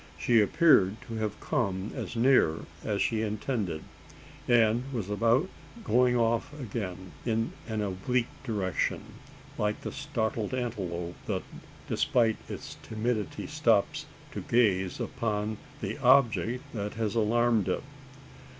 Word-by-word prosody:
She 115 +5 +4
appeared 105 - +5
to 115 -1 -5
have 110 -1 -2
come 100 -9 -1
as - - -5
near 115 -10 +4 0.2
as 105 -2 0
she 110 -2 0
intended, 105 - -2 0.6
and 120 +2 +3
was 110 -6 -3
about 115 - +3 0.4
going 125 - +3
off 115 +1 +1
again 95 -7 -5
in 115 -1 0
an 110 -2 -2
oblique 115 +6 -1
direction: 100 -7 -1 0.6
like 105 0 0
the - - -4
startled 130 -5 -2
antelope, 90 -9 -3
that, - - -1 0.4
despite 115 -3 +2
its - - -7
timidity, 110 -1 -2
stops - - +1 0.2
to - - -5
gaze 95 -6 +2
upon 110 -1 -2 0.2
the 105 +8 -3
"object 125 -2 +4
that 105 -2 -4
has 110 -2 -1
alarmed 115 -1 +2
it." - - -1
110 Hz, 125 wpm, -29 LUFS, 105-120 Hz, 0.6 s, appeared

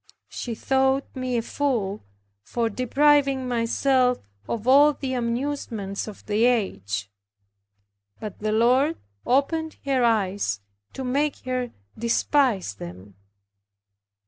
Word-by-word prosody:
She 235 -2 -5
thought 265 +2 +2
me 255 -1 -1
a 230 - 0
fool, 230 -8 -1 0.4
for 230 - -2
depriving 275 +2 +3
myself 250 +2 +2 0.3
of 230 +1 -3
all 290 +3 +7
the 265 -2 -4
amusements 235 -5 -2
of 215 - -10
the 215 +2 +2
age. 105 - 0 1.1
But 210 -2 -7
the 215 0 -1
Lord 255 +8 +3 0.3
opened 315 +5 +1
her 265 -3 +2
eyes, 200 - +1 0.3
to 265 - -5
make 280 +4 0
her 255 -1 -1 0.3
despise 235 - +1
them. 95 +1 -10
245 Hz, 110 wpm, -25 LUFS, 215-270 Hz, 1.1 s, all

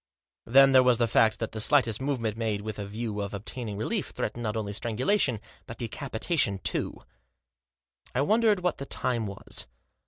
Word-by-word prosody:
Then 135 +3 +6
there 130 -1 +7
was 125 -2 +4
the 120 - +2
fact 110 0 +3
that 115 - -4
the 110 - -5
slightest 115 -3 +3
movement 125 -6 -1
made 110 -3 -2
with 110 0 -6
a 100 - -4
view 105 0 -4
of 100 0 -4
obtain 115 +3 -5
ing 100 - -5
relief 110 - -2
threatened 120 - -4
not 110 -1 -2
only 105 -2 -3
strangulation 125 - 0 0.3
but 115 - -8
de 120 - -3
capitation 130 - -1
too. 95 - -2 1.1
I 130 - +2
wondered 215 +3 +3
what 180 -2 -1
the 140 - -6
time 120 -4 -1
was. 100 -9 -4
115 Hz, 185 wpm, -27 LUFS, 105-135 Hz, 1.1 s, there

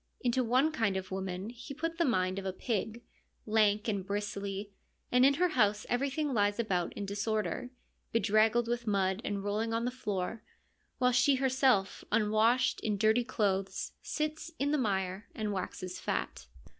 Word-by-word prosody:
Into 250 +1 +1
one 255 +6 +3
kind 225 -9 0
of 190 0 -6
woman 190 +2 -4
He 245 +3 -9
put 330 +2 -3
the 340 - +4
mind 185 -6 +1
of 195 - -7
a - - 0
pig, 220 +2 -3 0.4
lank 215 -1 +3
and 200 -3 -1
bristly, 200 0 -4 0.4
and 250 +1 +5
in 275 +1 +6
her 360 +4 +2
house 210 -7 +2
everything 275 +3 0
lies 205 -2 +2
about 190 -7 0
in 205 - -4
disorder, 215 +4 -2 0.4
bedraggled 225 +2 +3
with 240 0 -2
mud 195 0 +1
and 205 -6 -2
rolling 215 +3 -1
on 230 +1 0
the 250 - 0
floor, 210 -3 -3 0.6
while 250 -1 +3
she 265 +3 +4
herself, 260 -6 +2
unwashed, 220 +3 +3
in 210 -2 -1
dirty 220 +4 +3
clothes 195 -5 -1
sits 310 +2 -3
in 285 +1 0
the 300 - +2
mire 190 -3 -1
and 210 -1 -2
waxes 185 -1 -5
fat. 60 -1 -3
215 Hz, 165 wpm, -31 LUFS, 200-250 Hz, 0.6 s, in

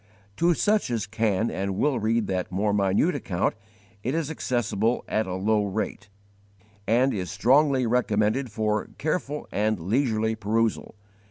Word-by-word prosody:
To 170 0 +3
such 210 -1 +1
as 115 -4 -1
can 110 0 0
and 95 0 -2
will 135 +1 +1
read 115 +1 +1
that 95 -2 -2
more 100 +3 0
minute 100 - +2
account 90 -1 -1 0.5
it 130 +7 -2
is 160 -2 -1
accessible 115 -5 -1
at 110 -1 0
a 90 - -3
low 105 +3 +1
rate,* 105 +1 -4 0.8
and 125 +5 +3
is 90 -3 -3
strongly 135 0 +3
recommended 115 +1 +1
for 105 -1 -1
careful 150 -1 -2
and 105 -1 0
leisurely 110 - 0
perusal. 110 +1 -1
110 Hz, 145 wpm, -25 LUFS, 105-125 Hz, 0.8 s, To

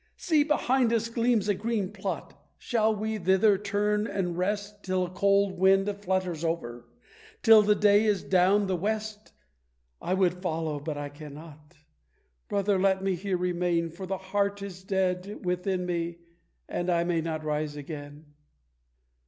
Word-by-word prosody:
See, 315 -4 +2
behind 265 -5 +2
us 230 0 0
gleams 230 -3 +1
a 205 - +3
green 210 -1 -2
plot, 195 -2 -5 0.2
shall 220 -3 +1
we 215 +1 -3
thither 190 +3 +4
turn 210 +1 0
and 180 -5 -2
rest 205 +3 -3
Till 185 -1 0
a - - -7
cold 200 0 +2
wind 195 +1 +4 0.2
flutters 185 -4 -1
over, 120 -8 -3 0.6
till 225 -2 +8
the 210 0 +3
day 205 +1 +4
is 205 -3 +1
down 190 +2 +3
the 190 -1 0
west? 215 +3 -3 0.7
I 185 - 0
would 180 -1 +1
follow, 160 -4 -2
but 150 0 -5
I 145 0 -4
cannot! 150 +1 -12 0.7
Brother, 200 -1 +1
let 190 0 +2
me 195 -1 +1
here 185 +1 -2
remain, 175 -2 0
For 185 +3 -8
the 195 +1 -2
heart 200 +1 -1
is 185 -2 -8
dead 190 0 -2
within 180 +1 -1
me, 170 -1 -2 0.5
and 175 +1 -3
I 170 -1 +2
may 170 -1 0
not 160 -1 -4
rise 150 -1 -2
again." 145 0 -8
190 Hz, 155 wpm, -28 LUFS, 170-205 Hz, 0.7 s, till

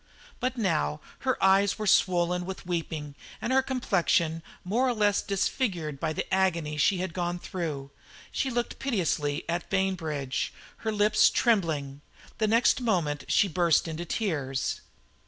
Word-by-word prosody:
But 255 +1 -1
now 155 - 0 0.2
her 260 -1 0
eyes 195 +1 +4
were 215 - -3
swollen 180 -2 +3
with 190 0 -7
weeping 160 -4 -3 0.3
and 255 - -1
her 265 - +5
complexion 175 -10 +1 0.2
more 230 +8 +1
or 245 - +1
less 205 -2 +2
disfigured 185 - -1
by 160 +1 -1
the 155 - -2
agony 170 -5 +1
she 185 +6 +3
had 180 -2 -3
gone 175 0 -2
through. 155 -7 -5 0.4
She 270 - -1
looked 240 -1 -2
piteously 165 - -1
at 170 +1 -2
Bainbridge, 160 -9 -1 0.2
her 220 - -2
lips 210 0 +4
trembling. 160 - +1 0.4
The 215 - +2
next 230 +3 +3
moment 170 -11 0
she 205 - +3
burst 170 -2 +2
into 165 +1 -4
tears. 145 -10 -2
180 Hz, 145 wpm, -28 LUFS, 155-210 Hz, 0.4 s, her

